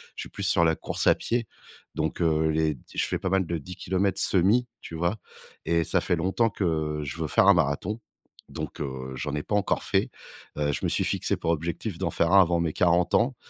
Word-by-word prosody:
je - - -6
suis - - -10
plus - - -7
sur 85 - +3
la 80 -1 +3
course - - -2
à - - +8
pied. 120 0 -1 0.5
Donc, 80 +2 -2
heu, 80 -1 +2
les 80 -1 +1
d 60 - -18
je - - +1
fais - - -2
pas 95 - -2
mal 95 0 +2
de 85 - -2
10 90 +5 -9
kilomètres 95 +1 -1
semi, 100 +7 +3 0.2
tu 80 - -8
vois? 85 +6 0 0.5
Et 85 0 +2
ça 95 - +1
fait 90 +1 +1
longtemps 95 +7 +1
que 80 -6 -1
je 70 - -5
veux 80 - -2
faire 95 - +3
un 100 - +9
marathon, 85 +7 0 0.5
donc - - -6
heu, 65 -2 -5
j'en 75 +3 -3
ai 75 - -3
pas 105 - -2
encore 105 - 0
fait, - - +1 0.5
heu, 75 -1 +1
je - - -3
me - - +1
suis - - +1
fixé - - 0
pour 85 - -1
objectif 85 +4 -3
d'en 90 -3 -1
faire 85 +2 +1
un 100 - +9
avant 85 -1 +2
mes 80 -2 -1
40 90 0 +2
ans. 120 +3 +2
85 Hz, 235 wpm, -26 LUFS, 80-95 Hz, 0.5 s, un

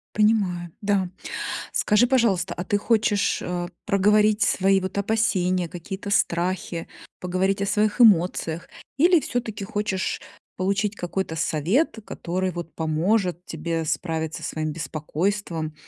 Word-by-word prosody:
Понимаю, 195 -6 +2
да. 200 -3 +1 0.6
Скажи, 210 +4 +3
пожалуйста, 200 -9 +2
а 175 - -4
ты 205 - +1
хочешь, 210 -2 +2
э, 175 -1 -3 0.2
проговорить 210 +1 +3
свои 195 -1 +3
вот 185 +1 -5
опасения, 185 -4 +1
какие-то 190 +4 -6
страхи, 175 -2 0 0.3
поговорить 185 +2 0
о - - 0
своих 210 +3 +1
эмоциях? 175 -5 +4 0.3
Или 345 +4 +5
всё-таки 225 -7 -3
хочешь 205 -2 -2 0.4
получить 200 +2 0
какой-то 180 -2 -3
совет, 180 - +1
который 185 +1 -2
вот 170 -1 -7
поможет 175 +3 0
тебе 165 0 -3
справиться 160 0 -2
своим 155 -1 -2
беспокойством 160 +1 -3
190 Hz, 115 wpm, -24 LUFS, 170-210 Hz, 0.6 s, Или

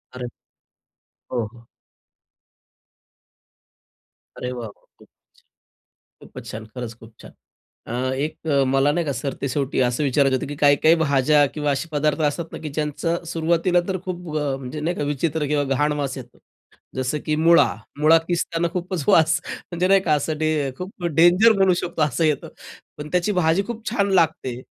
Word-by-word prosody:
अरे! 125 -1 -5 1.1
हो, 120 -3 -1
हो. 115 0 -16 2.7
अरे 125 0 -4
वाह! 120 -3 -5
वाह! 100 - -19 1.2
खूपचं - - -13
छान, - - -16
खूपचं - - -9
छान. 110 0 -7
खरंच 120 -2 -5
खूप 110 0 -15
छान. - - -12 0.6
अ, 130 +2 -2
एक 155 +3 -4 0.2
मला 135 +2 +3
नाही 170 +1 0
का? 140 - 0
सरते 135 +2 -4
शेवटी 135 0 -1
असं 125 +5 -1
विचारायचं 135 0 +2
होतं - - -4
की 145 - -6
काही, 145 -1 +5
काही 160 +4 +5
भाज्या 145 0 +4
किंवा 150 -1 -1
असे 165 +5 -3
पदार्थ 150 +1 0
असतात 165 +2 -5
ना - - -6
की 155 - -4
ज्यांचं 155 +4 -2
सुरुवातीला 170 +2 +1
तर 190 -1 -1
खूप 175 -4 -5
अ, 140 -2 -1
म्हणजे 135 +3 -7
नाही 175 +3 -2
का - - -2
विचित्र 150 +1 -1
किंवा 145 0 +1
घाण 150 +1 +1
वास 140 -1 -3
येतो. 120 -1 -12 0.6
जसं 130 +3 -1
की 155 - +1
मुळा. 165 +2 +5 0.3
मुळा 155 +2 +6
किस्ताना 170 -1 0
खूपच 180 -4 -3
वास 160 +1 +4
म्हणजे 180 +1 -3
नाही 195 0 +5
का 155 - +1
असं 150 +1 -2
डें 155 -4 0
खूप 180 -1 -8
डेंजर 175 +8 +5
म्हणू 190 -2 +4
शकतो 170 -2 -2
असं 150 +3 +1
येतं. 150 -2 0 0.5
पण 150 +1 -6
त्याची 180 +3 +1
भाजी 180 +1 +2
खूप 235 -1 -7
छान 200 -4 0
लागते. 155 -8 +1
150 Hz, 170 wpm, -22 LUFS, 140-170 Hz, 2.7 s, मुळा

